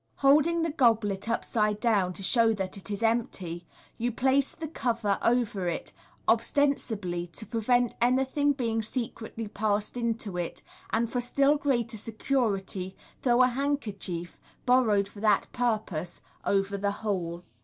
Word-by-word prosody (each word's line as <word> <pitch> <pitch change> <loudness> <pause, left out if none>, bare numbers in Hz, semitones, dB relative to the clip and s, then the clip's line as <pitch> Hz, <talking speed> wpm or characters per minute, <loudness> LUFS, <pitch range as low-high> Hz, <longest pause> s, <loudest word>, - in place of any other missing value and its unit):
Holding 305 +4 +4
the 330 - 0
goblet 225 -7 +2
upside 215 -2 0
down, 205 -6 +2
to 195 - -7
show 230 +2 +4
that 190 -3 -4
it 195 -2 -8
is 205 +2 -3
empty, 185 -7 -1 0.3
you 240 +2 0
place 265 +3 +2
the 320 - -5
cover 230 -8 -1
over 230 -6 +1
it, 170 - -3 0.3
ostensibly 210 -11 +1
to 175 +6 -5
prevent 245 +1 +1
anything 265 +4 +3
being 230 -4 -1
secretly 225 -1 -5
passed 210 +1 -1
into 230 -5 -2
it, 175 -1 -4 0.3
and, 230 +1 +1
for 245 - 0
still 275 +4 +3
greater 240 -6 0
security, 205 -5 -2 0.3
throw 245 0 +4
a - - +6
handkerchief, 210 - -3 0.3
borrowed 225 -6 +4
for 200 - -13
that 210 -1 +3
purpose, 215 -8 -1 0.3
over 200 0 +1
the 200 +1 +1 0.2
whole. 175 -4 -2
225 Hz, 140 wpm, -28 LUFS, 200-250 Hz, 0.3 s, a